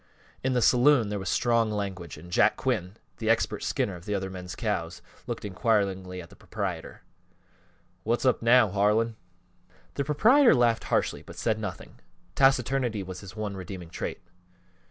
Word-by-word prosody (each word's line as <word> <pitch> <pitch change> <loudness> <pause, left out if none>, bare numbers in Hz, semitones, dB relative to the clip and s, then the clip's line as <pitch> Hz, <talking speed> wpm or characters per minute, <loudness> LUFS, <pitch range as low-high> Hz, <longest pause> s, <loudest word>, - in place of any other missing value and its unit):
In 130 0 +1
the 125 -2 +2
saloon 125 -3 +4
there 105 -1 -3
was 95 -1 -4
strong 115 -2 +2
language, 95 -5 -4
and 90 - -12
Jack 105 +4 +3
Quinn, 105 -7 -2 0.3
expert 115 +1 +1
skinner 100 - -1
of 85 +4 -11
other 95 -2 -2
men's 90 -2 -7
cows, - - -3 0.2
looked - - -4
inquiringly 95 -3 0
at 85 - -16
the - - -14
proprietor. 95 -6 -5 1.0
"What's 120 +4 -1
up 130 - +3
now, 115 -1 +5
Harlan?" 105 +4 +1 0.8
The 140 - -1
proprietor 225 - +5
laughed 120 -2 +2
harshly - - 0
but - - -13
said 110 -1 0
nothing 100 -5 -7 0.3
taciturnity 130 -5 +2
was 90 -1 -7
his 100 0 -11
one 105 -2 -4
redeeming 90 -2 -8
trait. - - -5
105 Hz, 155 wpm, -27 LUFS, 95-120 Hz, 1.0 s, now